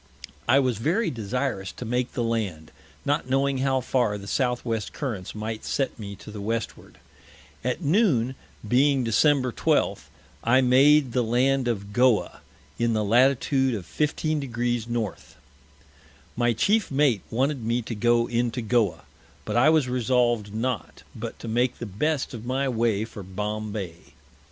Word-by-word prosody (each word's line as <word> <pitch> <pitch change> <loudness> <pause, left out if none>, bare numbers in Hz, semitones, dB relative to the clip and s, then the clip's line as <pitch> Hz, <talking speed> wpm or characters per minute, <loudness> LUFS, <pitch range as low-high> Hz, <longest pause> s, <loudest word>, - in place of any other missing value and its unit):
I 125 +3 +5
was 130 -6 +1
very 175 - +1
desirous 115 -2 -3
to 125 - -7
make 125 +2 -1
the 120 - -1
Land, 100 -9 -2 0.3
not 145 -2 0
knowing 135 0 +1
how 130 0 +1
far 120 -4 0
the 100 - -10
Southwest 120 -1 -1
Currents 110 -11 -5
might 110 +1 -4
set 135 -3 -2
me 100 -2 -6
to 105 - -11
the 105 -1 -7
Westward. 115 +1 -4 0.7
At 125 +8 -2
noon, 145 - +2 0.3
being 130 +2 +3
Dec. 130 +2 +2
12, - - 0 0.3
I 125 +3 +4
made 135 +2 +5
the 125 - +1
Land 125 +3 +1
of 100 -3 -3
Goa, 125 -1 +2 0.4
in 115 -1 +2
the 110 -1 +1
Latitude 130 +3 +3
of 95 -5 -6
15 155 - -1
Degrees 120 -3 -2
North. 120 -4 -4 1.0
My 120 0 +2
Chief 205 - +2
Mate 135 -7 +2
wanted 135 +2 0
me 115 +2 0
to 115 - -5
go 120 +2 +2
into 120 0 -1
Goa, 110 -7 +1 0.4
but - - -3
I 125 +6 +5
was 155 -4 +3
resolved 120 -3 +1
not, 115 +1 -3
but - - -6
to - - -9
make 120 +2 +1
the 120 - -5
best 130 +10 -1
of 115 -2 -7
my 130 +3 -1
Way 115 -4 +1
for 115 -2 -9
Bombay. 105 -1 -4
120 Hz, 155 wpm, -25 LUFS, 110-130 Hz, 1.0 s, I